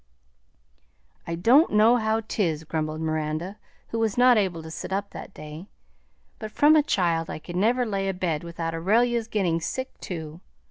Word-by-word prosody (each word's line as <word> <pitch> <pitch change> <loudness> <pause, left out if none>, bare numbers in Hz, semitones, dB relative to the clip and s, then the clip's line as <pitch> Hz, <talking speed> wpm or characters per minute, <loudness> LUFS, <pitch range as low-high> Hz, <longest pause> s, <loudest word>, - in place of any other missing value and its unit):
"I 165 - -2
don' 245 - +5
know 220 +3 +5
how 220 -1 0
'tis," 175 -8 -2
grumbled 155 0 -3
Miranda, 155 +5 -3 0.3
who 230 - -3
was 220 -1 0
not 250 0 +6
able 185 -6 0
to 160 - -9
sit 160 - -7
up 200 +1 -2
that - - -9
day; 155 +2 -10 0.7
"but 215 - -6
from 295 +7 +4
a 310 - +6
child 170 - 0
I - - -4
could 175 +3 -9
never 235 +7 +2
lay 195 -3 -2
abed 180 -5 -2
without 165 -1 -4
Aurelia's 225 +7 +1
gettin' 185 -7 0
sick 260 +10 -5
too. 160 -2 -7
190 Hz, 170 wpm, -25 LUFS, 165-225 Hz, 0.7 s, not